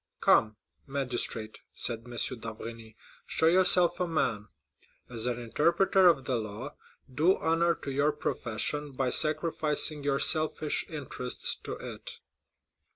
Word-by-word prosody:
"Come, 110 Hz, -1 st, +4 dB, 0.3 s
magistrate," 125 Hz, -5 st, -2 dB
said 115 Hz, 0 st, -3 dB
M. 120 Hz, -, -9 dB, 0.2 s
d'Avrigny, 115 Hz, 0 st, -8 dB, 0.3 s
"show -, -, 0 dB
yourself 180 Hz, 0 st, +5 dB
a 180 Hz, -, 0 dB
man; 125 Hz, -10 st, -1 dB, 0.6 s
as 115 Hz, 0 st, 0 dB
an 120 Hz, -1 st, -2 dB
interpreter 170 Hz, -, +3 dB
of 140 Hz, -6 st, +3 dB
the 125 Hz, -, 0 dB
law, 110 Hz, +6 st, -6 dB, 0.4 s
do 160 Hz, +8 st, +3 dB
honor 165 Hz, +1 st, +2 dB
to 140 Hz, -, -7 dB
your 145 Hz, +3 st, +2 dB
profession 145 Hz, +1 st, -2 dB
by 130 Hz, -1 st, -1 dB
sacrificing 155 Hz, -1 st, 0 dB
your 140 Hz, -1 st, +1 dB
selfish 155 Hz, 0 st, +1 dB
interests 135 Hz, -5 st, -3 dB
to -, -, -4 dB
it." -, -, -8 dB
140 Hz, 125 wpm, -29 LUFS, 120-160 Hz, 0.6 s, yourself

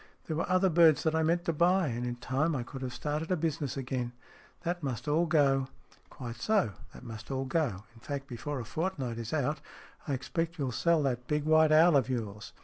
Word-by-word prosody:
There 160 Hz, -, -3 dB
were 165 Hz, -, -2 dB
other 185 Hz, 0 st, +3 dB
birds 160 Hz, -2 st, +5 dB
that 160 Hz, -, +1 dB
I 160 Hz, -, +2 dB
meant 170 Hz, +2 st, +1 dB
to 165 Hz, -, +1 dB
buy. 175 Hz, +1 st, +3 dB
And 120 Hz, +1 st, -3 dB
in 120 Hz, -, -3 dB
time 140 Hz, +6 st, 0 dB
I 125 Hz, -, -2 dB
could 130 Hz, +2 st, -9 dB
have 130 Hz, -1 st, -3 dB
started 150 Hz, +5 st, -3 dB
a 185 Hz, -, +2 dB
business 150 Hz, -4 st, -2 dB
again. 125 Hz, -2 st, -3 dB, 0.5 s
That 175 Hz, +1 st, -2 dB
must 125 Hz, -4 st, -4 dB
all 160 Hz, +4 st, +2 dB
go." 135 Hz, -4 st, +3 dB, 0.2 s
" -, -, -28 dB
Quite 120 Hz, -3 st, -7 dB
so. 200 Hz, -, +2 dB, 0.2 s
That -, -, -11 dB
must 110 Hz, -1 st, -9 dB
all 135 Hz, -1 st, -2 dB
go. 135 Hz, -, -1 dB
In 115 Hz, -, -17 dB
fact, 140 Hz, +2 st, -4 dB
before 135 Hz, +2 st, -5 dB
a 120 Hz, -, -5 dB
fortnight 140 Hz, -, -3 dB
is 115 Hz, 0 st, -5 dB
out 150 Hz, 0 st, 0 dB, 0.5 s
I 145 Hz, -, 0 dB
expect 165 Hz, +6 st, -3 dB
you'll 135 Hz, -4 st, -1 dB
sell 165 Hz, +5 st, +2 dB
that 125 Hz, -2 st, -1 dB
big 150 Hz, 0 st, 0 dB
white 155 Hz, 0 st, +5 dB
owl 160 Hz, +1 st, +6 dB
of 135 Hz, -2 st, +3 dB
yours. 105 Hz, -5 st, -4 dB
145 Hz, 225 wpm, -30 LUFS, 125-165 Hz, 0.5 s, owl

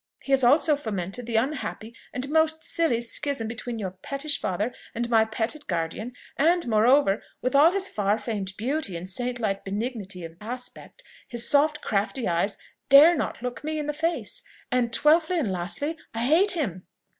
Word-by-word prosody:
He 275 Hz, -, -5 dB
has 270 Hz, -1 st, +5 dB
also 295 Hz, +5 st, +5 dB
fomented 220 Hz, -3 st, -4 dB
the 235 Hz, -, -3 dB
unhappy 230 Hz, -2 st, -2 dB, 0.2 s
and 255 Hz, +2 st, -4 dB
most 315 Hz, +1 st, +2 dB
silly 320 Hz, -9 st, +1 dB
schism 240 Hz, 0 st, 0 dB
between 235 Hz, +1 st, -5 dB
your 195 Hz, -4 st, -4 dB
pettish 275 Hz, +10 st, -3 dB
father 205 Hz, +6 st, -1 dB, 0.2 s
and 235 Hz, +1 st, -1 dB
my 220 Hz, -1 st, +5 dB
petted 225 Hz, +7 st, -3 dB
guardian; 175 Hz, +7 st, -3 dB, 0.2 s
and 335 Hz, +1 st, +3 dB
moreover, 225 Hz, 0 st, +4 dB, 0.2 s
with 255 Hz, -, 0 dB
all 295 Hz, +4 st, +6 dB
his 390 Hz, 0 st, +1 dB
far 205 Hz, -, 0 dB
famed 205 Hz, -3 st, -4 dB
beauty 250 Hz, -, -2 dB
and 175 Hz, +2 st, -7 dB
saint 245 Hz, +6 st, -1 dB
like 200 Hz, -4 st, -1 dB
benignity 200 Hz, -3 st, -4 dB
of 165 Hz, 0 st, -11 dB
aspect, 250 Hz, -, -7 dB, 0.2 s
his 240 Hz, -1 st, -1 dB
soft 300 Hz, +1 st, +3 dB
crafty 220 Hz, +4 st, -1 dB
eyes 175 Hz, +4 st, 0 dB, 0.3 s
dare 295 Hz, +5 st, +9 dB
not 280 Hz, -, -3 dB
look 250 Hz, +2 st, -5 dB
me 310 Hz, +1 st, -2 dB
in 300 Hz, -, -2 dB
the 295 Hz, -, -2 dB
face. 330 Hz, +10 st, -2 dB, 0.3 s
And 245 Hz, -2 st, +1 dB
twelfthly 320 Hz, +6 st, +3 dB
and 240 Hz, -, 0 dB
lastly, 200 Hz, -, -2 dB, 0.2 s
I 230 Hz, -, -1 dB
hate 345 Hz, +10 st, +4 dB
him." 200 Hz, -, -3 dB
245 Hz, 175 wpm, -26 LUFS, 210-295 Hz, 0.3 s, dare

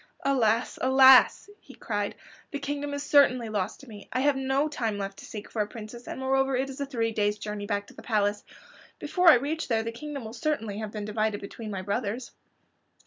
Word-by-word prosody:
"Alas, 235 Hz, -4 st, +1 dB
alas!" 265 Hz, +3 st, +7 dB
he -, -, -15 dB
cried. -, -, -3 dB, 0.3 s
"The 290 Hz, -, -4 dB
kingdom 285 Hz, +1 st, -4 dB
is 285 Hz, -, -4 dB
certainly 260 Hz, -5 st, +4 dB
lost 205 Hz, -1 st, -3 dB
to 275 Hz, -, -14 dB
me. 210 Hz, -3 st, -12 dB
I 255 Hz, -, 0 dB
have 285 Hz, 0 st, +3 dB
no 270 Hz, +2 st, +1 dB
time 230 Hz, -8 st, -2 dB
left 195 Hz, -1 st, -5 dB
to -, -, -10 dB
seek 210 Hz, -1 st, -8 dB
for 220 Hz, -, -2 dB
a 205 Hz, -, -1 dB
princess, 230 Hz, +2 st, -10 dB
and -, -, -6 dB
moreover 270 Hz, 0 st, +1 dB
it 270 Hz, +1 st, -1 dB
is 270 Hz, +2 st, -8 dB
a 280 Hz, -, -2 dB
three 230 Hz, -4 st, -1 dB
days' 210 Hz, -1 st, 0 dB
journey 210 Hz, -1 st, -5 dB
back 205 Hz, 0 st, -1 dB
to -, -, -16 dB
the -, -, -12 dB
palace. 205 Hz, -2 st, 0 dB, 0.5 s
Before 335 Hz, +4 st, +3 dB
I 315 Hz, -, +9 dB
reach 290 Hz, +6 st, -2 dB
there 225 Hz, -2 st, +1 dB
the 230 Hz, -, -3 dB
kingdom 280 Hz, +1 st, -7 dB
will 220 Hz, -, -7 dB
certainly 225 Hz, -5 st, -2 dB
have 215 Hz, -1 st, -4 dB
been 210 Hz, -1 st, -5 dB
divided 215 Hz, 0 st, -1 dB
between 215 Hz, +2 st, -8 dB
my 190 Hz, -2 st, -4 dB
brothers." 215 Hz, +4 st, -3 dB
235 Hz, 215 wpm, -27 LUFS, 210-275 Hz, 0.5 s, I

